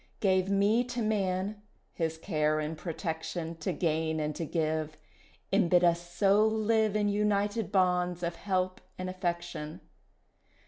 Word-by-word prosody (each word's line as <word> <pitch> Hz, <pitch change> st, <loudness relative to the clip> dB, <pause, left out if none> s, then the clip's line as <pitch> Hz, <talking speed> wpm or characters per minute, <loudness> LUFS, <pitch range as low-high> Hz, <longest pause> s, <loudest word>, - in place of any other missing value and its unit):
Gave 190 Hz, -1 st, +2 dB
me 205 Hz, +4 st, +3 dB
to 245 Hz, -1 st, -3 dB
Man, 205 Hz, -1 st, -1 dB, 0.3 s
his 160 Hz, -1 st, -2 dB
care 155 Hz, -3 st, 0 dB
and 155 Hz, +1 st, -3 dB
protection 165 Hz, 0 st, -4 dB
To 155 Hz, -, -2 dB
gain 160 Hz, -2 st, 0 dB
and 150 Hz, -1 st, -2 dB
to 165 Hz, -, -3 dB
give, 155 Hz, -2 st, -1 dB, 0.6 s
And 195 Hz, -3 st, +4 dB
bid 180 Hz, 0 st, +5 dB
us 170 Hz, -1 st, +4 dB
so 200 Hz, +3 st, +4 dB
live 220 Hz, -1 st, +2 dB
In 210 Hz, -1 st, +2 dB
united 205 Hz, +1 st, +1 dB
bonds 180 Hz, -2 st, +2 dB
of 170 Hz, 0 st, -1 dB
help 185 Hz, -2 st, -1 dB, 0.2 s
and 185 Hz, 0 st, -3 dB
affection. 175 Hz, -4 st, -4 dB
185 Hz, 140 wpm, -30 LUFS, 160-205 Hz, 0.6 s, bid